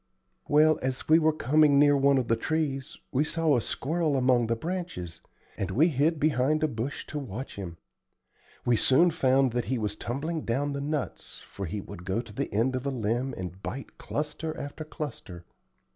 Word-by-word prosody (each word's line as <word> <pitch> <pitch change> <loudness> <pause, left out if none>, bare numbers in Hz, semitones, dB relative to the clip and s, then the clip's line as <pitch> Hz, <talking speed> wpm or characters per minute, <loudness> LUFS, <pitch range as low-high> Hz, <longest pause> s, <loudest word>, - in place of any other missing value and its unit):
"Well, 155 +1 +5
as 130 0 -3
we 160 +1 +6
were 160 -1 +4
coming 150 0 +4
near 145 0 +6
one 140 0 +4
of 125 -3 0
the 115 - +3
trees 140 +1 -2
we 135 +2 +2
saw 160 -1 +1
a 120 - +2
squirrel 155 +4 0
among 125 -2 +3
the 115 - +1
branches, 165 - -5 0.4
and 95 - -2
we 145 - +4
hid 155 +2 +1
behind 150 +1 +2
a - - +4
bush 125 +1 -4
to 150 - -5
watch 130 -1 -6
him. 90 -4 -7 0.9
We 120 -2 +3
soon 165 +10 +5
found 135 -4 +3
that 120 0 -1
he 130 - -1
was 105 -2 -2
tumbling 155 +9 -3
down 140 +4 -1
the 140 - -3
nuts, 145 -1 -4
for 100 -2 -6
he 100 +5 -4
would 85 - -10
go 95 +4 -1
to 115 -3 -7
the - - -3
end 115 +6 +1
of 130 +2 -3
a - - +2
limb 120 +1 -1
and 90 +1 -6
bite 135 +6 -7
cluster 155 +1 -4
after 145 +2 -6
cluster. 125 - -7
135 Hz, 190 wpm, -28 LUFS, 115-155 Hz, 0.9 s, we